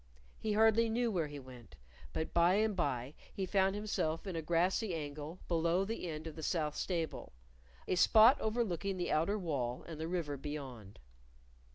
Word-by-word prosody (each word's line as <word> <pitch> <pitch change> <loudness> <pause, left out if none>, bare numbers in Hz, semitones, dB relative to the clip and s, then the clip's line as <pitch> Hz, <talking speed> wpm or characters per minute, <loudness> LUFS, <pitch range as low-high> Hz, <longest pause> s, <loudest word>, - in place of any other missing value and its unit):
He 215 -1 -1
hardly 225 +1 +4
knew 235 +1 +1
where 170 -6 0
he 145 0 -8
went, 125 - -12 0.4
but 160 - -3
by 170 +2 +5
and 215 0 +2
by 140 -6 -1 0.2
he 195 - -3
found 190 +1 +2
himself 200 -6 -2
in 190 -3 -4
a 165 - -1
grassy 175 +4 +1
angle 150 +2 -6
below 170 +2 +2
the 205 -4 -4
end 155 0 -5
of 160 - -6
the 160 - -7
south 155 -2 -1
stable; 165 - -3 0.5
a - - +1
spot 220 +8 +6
overlooking 200 -4 -1
the 175 - -2
outer 165 +7 +2
wall 135 -10 -2
and 160 -2 -7
the 160 - -3
river 165 -5 -2
beyond. 130 -8 -7
170 Hz, 175 wpm, -34 LUFS, 150-200 Hz, 0.5 s, spot